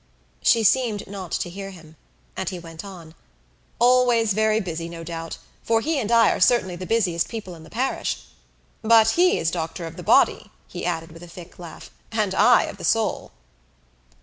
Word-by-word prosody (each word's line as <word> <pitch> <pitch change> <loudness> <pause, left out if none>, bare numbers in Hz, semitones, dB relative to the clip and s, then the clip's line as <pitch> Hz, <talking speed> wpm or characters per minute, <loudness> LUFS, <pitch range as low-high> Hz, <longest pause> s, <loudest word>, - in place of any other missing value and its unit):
She 230 - +4
seemed 225 -3 +2
not 190 -4 -8
to - - -1
hear 195 +2 -7
him. 160 -4 -14 0.4
And - - -3
he 185 - -6
went 165 0 -10
on 175 -5 -11 0.6
"Always 240 -3 +3
very 220 +1 +2
busy, 170 -4 -5
no 165 -1 -8
doubt; 165 -1 -6 0.2
for 225 0 +1
he 300 +5 -1
and 225 -3 -3
I 230 -2 +5
are - - -2
certainly 185 -4 +3
the 185 +1 -7
busiest 185 -7 +1
people 215 -6 -7
in 165 - -12
the 160 - -14
parish. 255 +8 -2 0.6
But 225 0 +5
he 360 +5 +3
is 165 - 0
doctor 165 0 -4
of 165 0 -9
the - - -7
body," - - +3 0.2
he 65 - -5
added 165 -1 -3
with 165 +1 -13
a 175 - -10
thick 175 +1 -13
laugh, 170 -2 -11 0.2
"and 215 -4 0
I 245 +5 +5
of - - -7
the - - -11
soul." 225 -2 0
190 Hz, 190 wpm, -23 LUFS, 170-225 Hz, 0.6 s, I